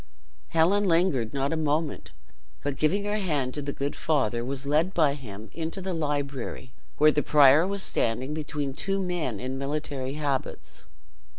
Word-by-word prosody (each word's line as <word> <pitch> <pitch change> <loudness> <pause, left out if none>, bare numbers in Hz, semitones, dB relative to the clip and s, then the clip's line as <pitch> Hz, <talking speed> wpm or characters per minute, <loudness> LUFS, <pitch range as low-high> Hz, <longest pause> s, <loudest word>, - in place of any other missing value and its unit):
Helen 180 +6 +3
lingered 165 - +2
not 140 +2 -1
a - - +1
moment, 155 0 -1 0.5
but 145 -1 -1
giving 165 +9 +1
her 205 +1 -1
hand 145 -9 -1
to 150 - -3
the 140 0 -3
good 140 +1 -3
father, 125 -7 0
was 135 +2 -4
led 155 +6 +1
by 155 -4 +4
him 110 -6 -9
into 165 +3 -4
the 190 0 -3
library, 145 -5 -3 0.2
where 155 0 +6
the 150 - +1
prior 150 +3 +6
was 200 0 -2
standing 125 +5 -1
between 150 -3 -3
two 195 +7 -1
men 175 - -2
in 130 +1 -4
military 140 -2 -3
habits. 145 -3 -3
145 Hz, 165 wpm, -27 LUFS, 135-165 Hz, 0.5 s, where